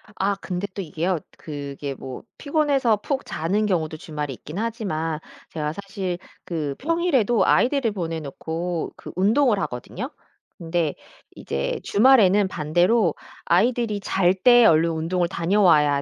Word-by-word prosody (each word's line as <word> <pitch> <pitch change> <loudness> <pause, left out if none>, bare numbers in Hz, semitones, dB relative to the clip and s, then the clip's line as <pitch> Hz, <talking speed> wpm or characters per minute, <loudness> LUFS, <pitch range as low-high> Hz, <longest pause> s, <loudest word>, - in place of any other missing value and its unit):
아 200 +1 0
근데 190 0 -4
또 200 - -4
이게요. 170 +1 -1 0.2
그게 140 -2 -6
뭐 130 -1 -8
피곤해서 285 -7 +2
푹 270 +6 -3
자는 195 +7 -1
경우도 160 -6 -1
주말에 150 -3 -5
있긴 150 +7 -9
하지만 185 -9 -2 0.3
제가 150 -1 -3
사실 195 -2 -4 0.3
그 150 -5 -3
평일에도 290 - +2
아이들을 260 -3 +3
보내 165 -5 -3
놓고 160 +4 -4
그 - - -10
운동을 215 +4 +3
하거든요. 125 -9 -5 0.5
근데 165 -2 -1 0.4
이제 70 0 -3
주말에는 205 -4 +5
반대로 175 +6 +2 0.3
아이들이 215 +3 +2
잘 185 -2 +2
때 240 +4 +6
얼른 165 -3 +5
운동을 170 +2 0
다녀와야 165 -6 +3
180 Hz, 295 characters per minute, -23 LUFS, 160-215 Hz, 0.5 s, 때